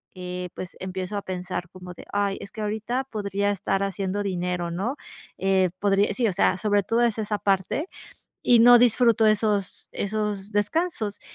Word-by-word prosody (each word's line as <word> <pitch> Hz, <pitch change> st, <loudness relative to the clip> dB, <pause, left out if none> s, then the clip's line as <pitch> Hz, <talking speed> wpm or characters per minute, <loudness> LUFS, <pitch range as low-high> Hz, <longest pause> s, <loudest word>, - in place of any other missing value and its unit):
eh, 180 Hz, 0 st, -5 dB
pues, 180 Hz, -, -7 dB
empiezo 185 Hz, +2 st, -4 dB
a -, -, -2 dB
pensar 180 Hz, -1 st, -4 dB
como 180 Hz, -1 st, -10 dB
de: -, -, -12 dB
"Ay, 200 Hz, -1 st, 0 dB
es 200 Hz, -, -8 dB
que 220 Hz, -, -7 dB
ahorita 220 Hz, +5 st, -2 dB
podría 205 Hz, -1 st, -1 dB
estar 195 Hz, 0 st, -1 dB
haciendo 195 Hz, +1 st, -2 dB
dinero", 180 Hz, -2 st, -2 dB
¿no?, 210 Hz, +11 st, -2 dB, 0.4 s
eh, 190 Hz, -1 st, +2 dB
podría 200 Hz, +1 st, +2 dB
sí, 235 Hz, -3 st, +2 dB
o -, -, +1 dB
sea, 190 Hz, -, +2 dB
sobre 205 Hz, -1 st, +2 dB
todo 230 Hz, +4 st, +1 dB
es 230 Hz, -2 st, +1 dB
esa 210 Hz, -1 st, -1 dB
parte, 195 Hz, -, 0 dB, 0.6 s
y 240 Hz, -2 st, +5 dB
no 240 Hz, +1 st, +8 dB
disfruto 230 Hz, -2 st, +4 dB
esos 210 Hz, -2 st, 0 dB
esos 210 Hz, -1 st, -3 dB
descansos, 215 Hz, -, -1 dB
200 Hz, 170 wpm, -25 LUFS, 185-215 Hz, 0.6 s, no